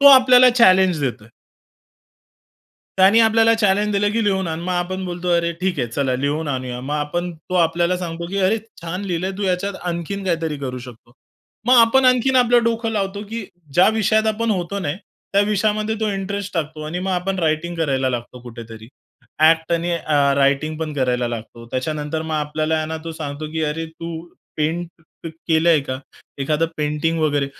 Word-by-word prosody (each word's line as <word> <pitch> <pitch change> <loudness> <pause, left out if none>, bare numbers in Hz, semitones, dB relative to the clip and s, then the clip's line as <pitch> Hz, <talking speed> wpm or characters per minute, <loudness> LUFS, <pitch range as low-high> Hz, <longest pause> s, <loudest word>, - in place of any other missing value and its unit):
तो 280 - +6
आपल्याला 255 -1 +7
चॅलेंज 190 -8 +4
देतोय. 120 -5 -3 1.7
त्यांनी 195 +4 +6
आपल्याला 225 0 +4
चॅलेंज 205 0 +2
दिलं, 205 0 +1
की 230 - +1
लिहून 190 -2 +1
आण. 160 0 -4
मग 180 +2 -3
आपण 185 +1 -2
बोलतो, 180 0 -4
अरे, 170 0 0
ठीक 185 -3 -1
आहे, 125 - 0
चला 130 +2 -1
लिहून 145 +4 -2
आणूया. 130 -2 -3
मग 140 +4 -4
आपण 150 +4 -2
तो 160 +3 -9
आपल्याला 170 +1 +2
सांगतो, 170 -1 -5
की 190 +3 -5
"अरे 220 +4 +2 0.2
छान! 180 +4 -4
लिहिलंय 185 0 -2
तू. - - -3
ह्याच्यात 190 +1 -1
आणखीन 175 +3 -4
काहीतरी 165 -4 -1
करू 130 -2 -5
शकतो." 120 -1 -14 0.6
मग 250 - +7
आपण 230 +4 +4
आणखीन 255 +1 +4
आपलं 245 -1 +4
डोकं 230 0 0
लावतो, 200 -1 -2
की 230 -1 -4 0.3
ज्या 180 - +6
विषयात 220 0 +2
आपण 220 +1 0
होतो 190 0 -2
नाही, 150 -5 -3 0.4
त्या 200 - +4
विषयामध्ये 215 +1 0
तो 220 - +1
इंटरेस्ट 200 +1 -4
टाकतो 155 -2 -3
आणि 165 +3 -4
मग 190 +1 -2
आपण 185 +2 -1
रायटिंग 165 +1 0
करायला 135 -5 0
लागतो 120 0 -5
कुठेतरी. 115 -2 -10 0.5
ॲक्ट 160 +1 +4
आणि 170 +1 0
अ, 145 -4 +1
रायटिंग 140 +3 +1
पण 160 -1 -3
करायला 125 -3 0
लागतो. 115 0 -8
त्याच्यानंतर 150 +4 -3
मग 160 0 -4
आपल्याला 155 +1 -1
आहे 155 0 -1
ना, 160 +1 -4
तो 165 - -5
सांगतो, 155 -1 -6
की 160 0 -2
अरे 160 +2 -3
तू 165 +1 -7 0.4
पेंट 165 +3 -1 0.4
अ, - - -3 0.2
केलंय 160 -1 +4
का? 130 -1 -4 0.4
एखादं 150 +4 0
पेंटिंग 150 +2 -1
वगैरे? 145 -2 +1
170 Hz, 180 wpm, -20 LUFS, 150-195 Hz, 1.7 s, आपल्याला